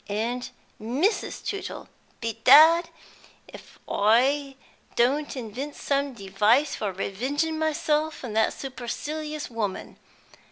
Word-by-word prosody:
And 235 +4 -2 0.3
Mrs. 280 - -1
Tootle! 400 -1 -5 0.3
Bedad, 280 +9 +6 0.6
if - - -14
I 270 +7 +2 0.4
don't 275 +4 +1
invent 255 +5 -6
some 280 -1 -1
device 210 +8 +2
for 205 -2 -3
revenging 275 - -2
myself 310 -1 0
on 235 -4 -5
that 220 0 +2
supercilious 295 +4 -5
woman. 210 -4 -4
265 Hz, 95 wpm, -25 LUFS, 225-300 Hz, 0.6 s, Bedad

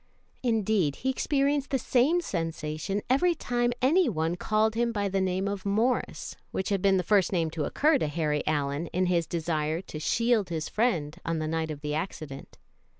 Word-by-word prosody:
Indeed, 215 - +1
he 265 - -1
experienced 280 +1 0
the 270 - +1
same 265 +8 +2
sensation 165 - -3
every 340 +7 +3
time 240 -4 0
any 335 +7 +4
one 160 +2 -1
called 215 +4 +1
him 235 +1 +1
by 205 -3 -1
the 195 0 0
name 190 +1 0
of 200 -1 -3
Morris, 220 +5 0
which 190 - -3
had 200 -2 0
been 195 0 +4
the 180 - 0
first 195 +1 +3
name 165 -4 0
to 155 -2 -2
occur 295 - +3
to - - 0
Harry 150 -1 0
Allyn, 145 +1 0
in 185 +3 0
his 170 -3 +1
desire 160 -2 -1
to 155 -5 -8
shield 230 +3 +1
his 160 -2 -3
friend 170 -11 0
on 165 0 -1
the 155 0 -2
night 160 0 -1
of 150 -2 -6
the 150 0 -3
accident. 155 -4 -5
190 Hz, 190 wpm, -28 LUFS, 160-235 Hz, -, any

